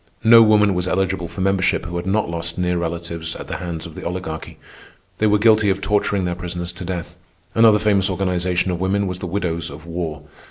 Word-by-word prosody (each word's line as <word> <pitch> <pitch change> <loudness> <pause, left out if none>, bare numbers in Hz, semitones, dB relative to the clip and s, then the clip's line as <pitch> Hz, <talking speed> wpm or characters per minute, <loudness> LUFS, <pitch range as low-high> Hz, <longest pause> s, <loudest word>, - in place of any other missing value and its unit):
No 115 +1 +8
woman 105 -2 +5
was 90 0 -2
eligible 95 -1 -1
for 95 - -7
membership 95 -1 +1
who 85 0 -6
had 85 +2 -4
not 105 +2 +1
lost 85 0 -3
near 90 -1 0
relatives 85 -1 -4
at - - -7
the - - -5
hands 85 -2 -5
of 85 - -9
the - - -9
Oligarchy. 85 -3 -5 0.6
They 110 - +3
were 105 0 +4
guilty 110 -1 +4
of 95 0 +1
torturing 100 -1 0
their 90 - -1
prisoners 90 0 -5
to 90 - -8
death. 90 -1 -5 0.4
Another 115 -2 +6
famous 100 -2 +2
organization 90 -1 0
of 90 0 -3
women 100 +2 +1
was 90 -1 -4
The 95 - -5
Widows 85 -3 -2
of 75 +3 -11
War. 85 -3 -5
90 Hz, 210 wpm, -20 LUFS, 85-100 Hz, 0.6 s, No